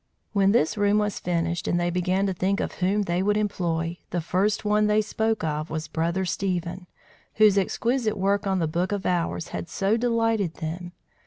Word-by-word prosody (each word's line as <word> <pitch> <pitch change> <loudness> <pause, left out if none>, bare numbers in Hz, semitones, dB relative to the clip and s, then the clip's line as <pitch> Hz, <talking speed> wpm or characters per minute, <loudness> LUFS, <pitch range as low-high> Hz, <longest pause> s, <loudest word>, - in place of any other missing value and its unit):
When 200 -1 +4
this 210 -2 +2
room 205 0 +3
was 210 -1 0
finished, 170 -1 -1
and 175 - +1
they 175 0 0
began 185 +2 +1
to 195 - 0
think 190 +3 0
of - - -2
whom 200 +3 +2
they 175 -1 0
would 205 +2 +2
employ, 175 -5 -1
the 175 - -1
first 190 +6 0
one 210 0 +3
they 210 0 +3
spoke 220 -1 -1
of 155 0 -2
was 160 0 -4
Brother 170 +4 -1
Stephen, 180 -1 -2 0.5
whose 215 -2 +6
exquisite 220 +3 0
work 200 +1 +1
on 190 -1 +1
the 165 -3 +1
book 175 +5 -1
of 200 -1 -2
hours 170 -2 -1
had 170 - -5
so 200 +5 +1
delighted 225 -6 +1
them. 175 +2 -5
190 Hz, 190 wpm, -25 LUFS, 175-210 Hz, 0.5 s, whose